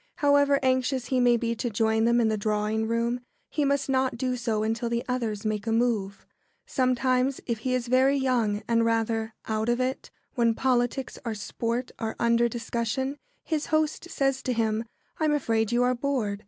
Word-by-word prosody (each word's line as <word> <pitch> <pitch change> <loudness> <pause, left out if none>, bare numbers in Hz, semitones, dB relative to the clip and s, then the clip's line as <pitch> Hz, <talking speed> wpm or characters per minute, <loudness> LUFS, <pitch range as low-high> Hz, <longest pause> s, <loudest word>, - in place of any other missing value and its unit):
However 285 -2 +4
anxious 260 0 +1
he 260 - +2
may 245 -1 +4
be 230 0 -1
to 235 +1 -3
join 220 +1 +1
them 235 +1 +4
in 230 - +3
the 220 - +1
drawing 215 +1 -1
room, 235 +2 0 0.3
he 300 - 0
must 280 0 +1
not 260 -2 +1
do 255 +1 -1
so 225 -3 -1
until 225 +2 -1
the 235 0 -1
others 230 -5 -2
make 215 0 -2
a - - +1
move. 225 -4 0 0.4
Sometimes, 255 +1 +1
if 235 -3 -2
he 255 +3 0
is 250 -2 -1
very 260 +3 +4
young 235 -6 0
and 230 -1 +3
rather 225 -1 0
"out 220 +1 -1
of 240 +1 +1
it" 255 +1 -2 0.2
when 235 -3 +2
politics 255 +1 0
or 230 -3 -3
sport 230 +4 -3
are 220 -1 -3
under 235 0 +3
discussion, 240 +4 -2 0.2
his 310 -3 -2
host 310 +2 0
says 270 -3 0
to 255 - -1
him, 225 -1 0 0.3
"I'm 305 -2 +2
afraid 225 -5 0
you 240 +1 +3
are 250 0 +3
bored. 240 -6 -1
240 Hz, 185 wpm, -27 LUFS, 225-260 Hz, 0.4 s, However